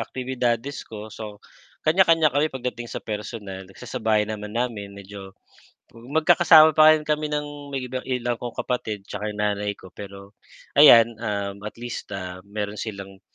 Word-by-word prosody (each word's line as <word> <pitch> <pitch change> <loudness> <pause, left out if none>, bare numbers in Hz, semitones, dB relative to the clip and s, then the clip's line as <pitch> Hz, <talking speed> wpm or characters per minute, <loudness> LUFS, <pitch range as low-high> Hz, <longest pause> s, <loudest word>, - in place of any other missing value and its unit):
aktibidades 125 +1 -2
ko, 110 0 -9
so 105 -2 -8 0.5
kanya-kanya 165 -2 +4
kami 145 +3 +2
pagdating 125 -3 -5
sa - - -6
personal 105 -3 -6
nagsasabayan 110 0 -1
naman 105 0 -7
namin 110 -5 -3
medyo, 100 -1 -10 0.6
magkakasama 155 +6 +5
pa 155 0 +7
rin 155 - -6
kami 150 0 -1
ng 145 -1 -5 0.4
ilang 120 -2 -1
kong 120 -1 -6
kapatid 110 -5 -3
'tsaka 105 +1 -5
'yong 105 - -8
nanay 105 0 0
ko 95 - -15
pero, 100 0 -10 0.5
ayan, 115 -6 +9
um, 100 -3 -3
atleast, 115 +3 -6
ah, 90 -1 -7
meron 105 0 -4
silang 100 -3 -7
115 Hz, 140 wpm, -24 LUFS, 100-130 Hz, 0.6 s, ayan